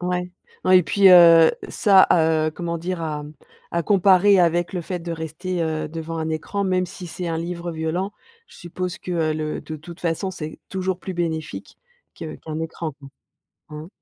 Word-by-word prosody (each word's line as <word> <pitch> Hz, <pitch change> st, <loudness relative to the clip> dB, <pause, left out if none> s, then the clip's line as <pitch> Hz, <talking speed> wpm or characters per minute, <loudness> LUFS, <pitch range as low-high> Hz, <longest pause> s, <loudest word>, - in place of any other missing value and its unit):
Ouais, 180 Hz, 0 st, -2 dB, 0.3 s
ouais 185 Hz, 0 st, +7 dB
et 180 Hz, -, +2 dB
puis, 200 Hz, +2 st, +4 dB
heu, 170 Hz, -2 st, +8 dB, 0.2 s
ça, 195 Hz, -2 st, +5 dB
heu 160 Hz, -2 st, +2 dB
comment 170 Hz, 0 st, -4 dB
dire 175 Hz, +1 st, -4 dB
à, 150 Hz, -2 st, -4 dB
mmh, 150 Hz, -, -11 dB, 0.4 s
à 170 Hz, -, 0 dB
comparer 195 Hz, +2 st, +4 dB
avec 175 Hz, 0 st, +2 dB
le 180 Hz, -, -2 dB
fait 175 Hz, +1 st, -5 dB
de 170 Hz, 0 st, -6 dB
rester, 165 Hz, +3 st, -4 dB
heu, 155 Hz, -1 st, -2 dB
devant 165 Hz, +1 st, -6 dB
un 160 Hz, 0 st, -2 dB
écran, 160 Hz, +6 st, -3 dB
même 185 Hz, -1 st, 0 dB
si 180 Hz, 0 st, -9 dB
c'est 180 Hz, +2 st, -6 dB
un 165 Hz, -1 st, -2 dB
livre 170 Hz, 0 st, -5 dB
violent, 165 Hz, +5 st, -3 dB, 0.3 s
je -, -, -17 dB
suppose 180 Hz, +1 st, -5 dB
que, -, -, -8 dB
heu, 160 Hz, -2 st, 0 dB
le 155 Hz, 0 st, -3 dB
de 155 Hz, -, -7 dB
toute 170 Hz, +3 st, -12 dB
façon 175 Hz, +3 st, -2 dB
c'est 155 Hz, -4 st, -8 dB
toujours 190 Hz, -1 st, -2 dB
plus 190 Hz, -, -6 dB
bénéfique 160 Hz, -3 st, -4 dB, 0.4 s
que 155 Hz, -1 st, -7 dB
qu'un 155 Hz, 0 st, -6 dB
écran 160 Hz, 0 st, -5 dB
quoi. 140 Hz, 0 st, -14 dB, 0.6 s
Mmh. 150 Hz, +1 st, -8 dB
170 Hz, 195 wpm, -22 LUFS, 160-180 Hz, 0.6 s, heu